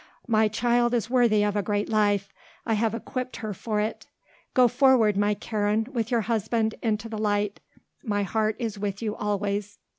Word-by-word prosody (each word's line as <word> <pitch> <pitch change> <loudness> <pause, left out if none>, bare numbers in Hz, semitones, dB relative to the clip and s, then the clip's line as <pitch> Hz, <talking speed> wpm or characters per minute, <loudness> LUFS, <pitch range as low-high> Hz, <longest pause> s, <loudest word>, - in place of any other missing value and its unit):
My 220 -1 +3
child 240 +2 +1
is 230 0 -2
worthy 235 -5 +4
of 205 0 0
a 205 - +2
great 205 +1 -1
life, 205 -2 +1 0.3
I 225 - +1
have 220 +1 +1
equipped 255 +2 -5
her 215 -2 -4
for 210 +3 -2
it. 215 +1 -3 0.5
Go 250 -1 +6
forward, 245 -4 +4
my 205 +1 +2
Karen, 210 +1 -1
with 235 -4 -2
your 240 -3 +2
husband, 220 0 0
into 220 -1 -1
the 220 -1 -5
light. 205 -1 0 0.4
My 205 -5 0
heart 215 +2 0
is 220 -4 -4
with 200 +1 -3
you 215 -1 -2
always. 205 0 -2
215 Hz, 180 wpm, -26 LUFS, 205-230 Hz, 0.5 s, Go